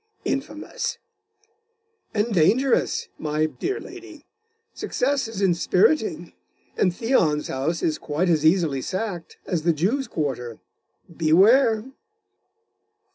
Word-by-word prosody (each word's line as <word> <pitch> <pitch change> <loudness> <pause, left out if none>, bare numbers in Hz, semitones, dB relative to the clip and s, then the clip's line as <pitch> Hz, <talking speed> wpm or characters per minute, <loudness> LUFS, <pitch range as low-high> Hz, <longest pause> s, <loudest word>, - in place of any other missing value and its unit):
'Infamous!' 310 - -3 1.1
'And 220 +2 -1
dangerous, 230 - +2
my 155 0 0
dear 375 - -3
lady. 355 -5 -12 0.5
Success 275 0 -1
is 210 -3 -4
inspiriting.... 180 - +1 0.4
and 185 - +2
Theon's 175 - +1
house 145 +6 -2
is 155 - 0
quite 155 +5 -1
as 160 -3 +2
easily 160 -5 +2
sacked, 185 -2 -5
as 175 -3 -1
the 170 +1 +2
Jews' 220 - 0
quarter.... 130 - -3 0.6
Beware. 215 - +4
185 Hz, 100 wpm, -23 LUFS, 155-250 Hz, 1.1 s, Beware